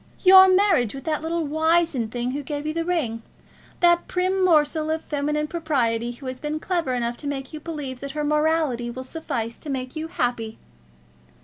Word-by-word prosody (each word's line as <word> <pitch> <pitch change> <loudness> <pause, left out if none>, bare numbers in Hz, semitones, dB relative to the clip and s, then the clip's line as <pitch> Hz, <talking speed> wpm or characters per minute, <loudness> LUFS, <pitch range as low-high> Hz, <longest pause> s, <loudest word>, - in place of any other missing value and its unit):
"Your 380 0 +9
marriage 370 - +3
with 270 - -8
that 310 -2 -1
little 330 0 -2
wizened 315 -5 +1
thing 245 +1 -2
who 285 +2 -3
gave 290 +1 -5
you 310 - -1
the 330 0 -1
ring 305 -11 -1 0.6
that 345 0 +4
prim 370 +1 0
morsel 310 -2 +3
of 320 0 -1
feminine 300 +1 -1
propriety 255 -9 -1
who 265 +3 -13
has 255 0 -5
been 300 +1 -3
clever 335 -7 -1
enough 240 0 -2
to 290 - -7
make 270 0 -4
you 310 - -5
believe 295 -5 -6
that 275 0 -6
her 300 - 0
morality 300 -5 +1
would 255 +2 -7
suffice 235 -6 -4
to 305 - -9
make 255 0 -4
you 315 +1 -4
happy." 240 -7 -2
300 Hz, 190 wpm, -24 LUFS, 255-325 Hz, 0.6 s, Your